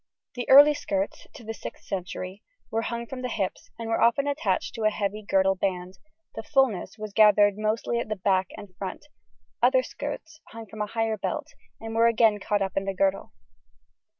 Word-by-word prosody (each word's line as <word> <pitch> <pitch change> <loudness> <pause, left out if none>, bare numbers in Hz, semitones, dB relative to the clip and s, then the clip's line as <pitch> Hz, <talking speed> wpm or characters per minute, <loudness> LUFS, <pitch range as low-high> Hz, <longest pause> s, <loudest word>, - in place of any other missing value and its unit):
The 245 -1 -5
early 290 +2 +9
skirts 200 -8 -3
(to 240 - -11
the 225 - -5
6th 225 - -9
century) 185 0 -5 0.3
were 225 - 0
hung 235 +1 -4
from 255 +2 -7
the 250 - -3
hips, 200 -5 -3
and 230 - -6
were 225 - 0
often 235 +4 +3
attached 280 -10 -1
to 225 - -6
a 215 - +5
heavy 210 0 -3
girdle 195 -2 +2
band, 185 -1 -3 0.3
the - - -5
fullness 225 -6 0
was 215 -2 -7
gathered 210 -1 +6
mostly 220 +2 0
at 235 - -4
the 215 - -1
back 190 -1 +1
and 205 -4 -11
front; 195 +8 -6 0.6
other - - +4
skirts 320 0 -7
hung 225 0 -9
from 215 +1 -8
a 210 - -1
higher 225 0 -1
belt - - -3 0.3
and 225 0 -7
were 230 +1 +4
again 225 -2 +3
caught 205 0 0
up 190 -1 -4
in 195 - -1
the 195 -1 -3
girdle. 195 +1 0
215 Hz, 195 wpm, -26 LUFS, 195-230 Hz, 0.6 s, early